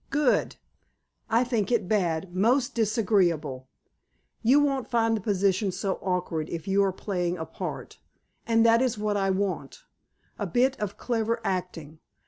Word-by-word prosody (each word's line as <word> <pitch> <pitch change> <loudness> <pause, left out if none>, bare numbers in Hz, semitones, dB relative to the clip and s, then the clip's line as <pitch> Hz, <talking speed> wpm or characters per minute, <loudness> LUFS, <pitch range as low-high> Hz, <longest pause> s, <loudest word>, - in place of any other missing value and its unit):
"Good!" 285 -2 +1 0.7
"I 230 +2 +3
think 235 -3 -1
it 220 -6 +1
bad, 175 -4 0
most 240 +7 +2
disagreeable." 180 - 0 0.7
"You 255 +5 +5
won't 275 -3 0
find 225 -2 +2
the 215 - -3
position 195 -1 +1
so 190 +1 -3
awkward 180 -4 -2
if 170 +2 -6
you 195 +1 +3
are 195 - +1
playing 180 -2 -2
a 160 - -4
part. - - -7 0.5
And 225 0 +4
that 230 +1 +5
is 255 -4 0
what 210 0 -1
I 195 -1 +1
want—a 200 - -5
bit 260 +2 +2
of 205 -1 -4
clever 230 -1 -1
acting. 170 -5 -4
205 Hz, 145 wpm, -26 LUFS, 180-230 Hz, 0.7 s, You